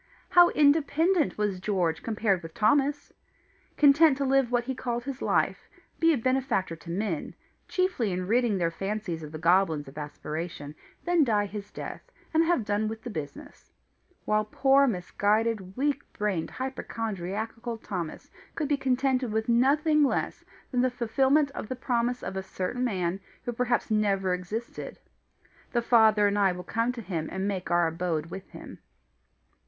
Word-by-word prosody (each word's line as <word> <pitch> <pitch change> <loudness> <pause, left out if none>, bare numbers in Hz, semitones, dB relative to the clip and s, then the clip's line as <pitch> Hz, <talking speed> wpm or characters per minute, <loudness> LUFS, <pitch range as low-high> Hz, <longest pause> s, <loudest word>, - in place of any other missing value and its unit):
How 350 -1 +7
independent 305 +3 +3
was 205 -3 -1
George 180 -5 0
compared 210 -5 0
with 165 -1 -10
Thomas! 285 +6 +1 0.6
content 295 0 +6
to 280 - -1
live 270 -2 +2
what 245 -1 +2
he 265 +2 -3
called 240 -1 -3
his 275 0 -6
life, - - 0 0.3
be 330 0 +5
a 305 - +2
benefactor 255 -8 0
to 165 +1 -13
men, 180 -2 -3 0.3
chiefly 365 - 0
in 180 0 -2
ridding 230 0 +2
their 170 -2 0
fancies 195 -2 -4
of 150 -1 -8
the 155 - -6
goblins 165 -3 +2
of 135 +3 -9
aspiration, 150 0 -6 0.3
then 345 -2 +4
die 210 -5 +2
his 205 0 -7
death, - - -7 0.3
and 320 +1 +4
have 330 -10 +1
done 205 +1 0
with 220 0 -6
the 245 - -5
business; 210 - -8 0.5
while 215 0 +2
poor 270 +5 +3
misguided, 205 0 0
weak 285 +1 0
brained, 200 -6 -1
hypochondriacal 225 -2 -4
Thomas 180 -7 -6 0.2
could 305 - -1
be 290 0 +1
contented 260 -2 +1
with 220 0 -1
nothing 290 +6 +3
less 280 - -1 0.3
than 250 -2 +2
the 255 - +3
fulfilment 265 +4 +2
of 245 - -6
the 255 - -2
promise 245 -1 -1
of - - -5
a 190 - -2
certain 190 +6 -3
man 185 -6 -1 0.2
who 240 - -3
perhaps 245 -1 0
never 195 -3 +2
existed: 195 +6 -5 0.8
"The 240 -1 +1
Father 220 -3 +5
and 205 0 0
I 195 -2 +3
will 180 0 -7
come 230 +6 0
to 235 -2 -7
him 170 -5 -3
and 190 +1 -2
make 190 -3 -3
our 175 0 +3
abode 165 -1 -2
with 190 +1 -8
him." - - -11
220 Hz, 165 wpm, -27 LUFS, 185-265 Hz, 0.8 s, How